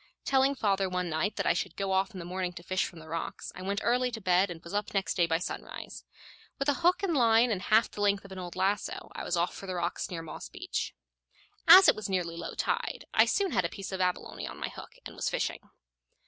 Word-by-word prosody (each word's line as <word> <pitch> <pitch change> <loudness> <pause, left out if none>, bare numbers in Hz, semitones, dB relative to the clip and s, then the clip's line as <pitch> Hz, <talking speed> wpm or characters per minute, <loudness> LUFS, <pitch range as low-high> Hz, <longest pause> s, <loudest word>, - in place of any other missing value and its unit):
Telling 270 +1 +3
father 195 -5 +1
one 180 -2 -2
night 160 +7 0
that - - -2
I - - +4
should 180 -3 -3
go 195 -1 -2
off 190 +1 +2
in 195 - -10
the 175 - -6
morning 180 0 -3
to 170 - -10
fish 185 +2 0
from 175 - -9
the 160 0 -11
rocks, 165 +1 -5
I - - -9
went 200 +2 -2
early 250 +1 +2
to 230 -2 -6
bed, 185 -1 +3
and 170 -2 -6
was 170 - -9
up 205 0 -2
next 195 -1 +1
day 170 -2 +2
by 165 0 +2
sunrise. 175 - -7 0.5
With 275 - -2
a - - +4
hook 360 +4 +3
and 370 -4 +1
line 235 -1 +5
and 190 -4 -1
half 220 +3 +3
the 205 - -6
length 200 -1 +2
of 195 - -12
an 190 - -7
old 175 -2 -7
lasso, 200 +2 -1
I - - -5
was 175 - -1
off 170 +1 +1
for 195 - -9
the 185 - -3
rocks 175 0 -2
near 170 -3 -5
Moss 160 - -8
Beach. 365 - -4 0.7
As 380 +1 +11
it - - +6
was 215 -1 -5
nearly 175 -3 -1
low 170 0 -6
tide, - - -2
I - - +6
soon 395 -3 +1
had 185 - +2
a 170 - -1
piece 195 +2 -7
of 190 -1 -3
abalone 180 -1 -2
on - - -8
my - - -3
hook, - - -11
and - - -8
was - - -1
fishing. - - -1
190 Hz, 260 wpm, -30 LUFS, 175-215 Hz, 0.7 s, As